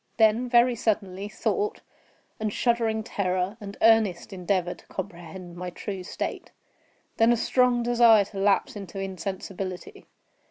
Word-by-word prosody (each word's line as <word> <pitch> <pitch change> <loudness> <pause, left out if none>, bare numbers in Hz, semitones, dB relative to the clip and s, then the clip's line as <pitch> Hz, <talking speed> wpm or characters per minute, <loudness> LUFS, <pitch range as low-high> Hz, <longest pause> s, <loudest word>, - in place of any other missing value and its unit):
Then, 225 +3 +3
very 240 +1 +5
suddenly, 205 -3 -2
thought, 415 - -2 0.6
and 215 -1 -1
shuddering 225 -1 +1
terror, 185 0 -1
and 200 -1 -8
earnest 220 -5 +3
endeavor 180 -1 -1
to - - -20
comprehend 175 -1 -8
my 180 +1 -5
true 190 +2 -6
state. 180 - -5 0.7
Then 225 +1 +5
a 240 - +3
strong 250 0 +2
desire 235 -3 +5
to 195 0 -8
lapse 200 +2 +2
into 195 -1 -7
insensibility. 195 - -6
205 Hz, 130 wpm, -26 LUFS, 185-230 Hz, 0.7 s, very